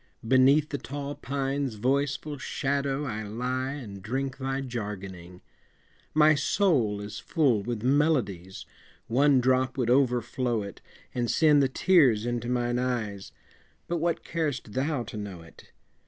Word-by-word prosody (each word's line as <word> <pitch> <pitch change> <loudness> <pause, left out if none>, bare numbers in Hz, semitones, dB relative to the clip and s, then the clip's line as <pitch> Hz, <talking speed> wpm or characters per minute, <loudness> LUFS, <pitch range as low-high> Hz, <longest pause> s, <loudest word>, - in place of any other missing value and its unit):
Beneath 135 +4 +5
the 140 - -3
tall 140 +1 -5
pine's 135 -2 -2
voiceful 140 +5 -1
shadow 140 +1 -1
I 110 -5 -3
lie 125 +5 -3
and 105 -9 -8
drink 130 +6 -3
thy 135 0 -2
jargoning; 95 -7 -6 0.7
My 155 0 +6
soul 145 - +1
is 105 0 -7
full 135 - +2
with 115 +1 -4
melodies, 125 - 0 0.4
One 135 +3 +4
drop 130 +1 +1
would 120 -2 +1
overflow 125 -3 +1
it, 100 - -9 0.3
And 120 -2 -1
send 150 -3 +5
the 135 - +2
tears 130 - +4
into 120 0 -2
mine 120 0 0
eyes 110 -6 -3 0.6
But 170 - -1
what 170 +1 -1
car'st 145 -10 -3
thou 135 -1 -1
to 110 - -8
know 100 -5 -6
it? 80 - -17
130 Hz, 140 wpm, -27 LUFS, 110-140 Hz, 0.7 s, My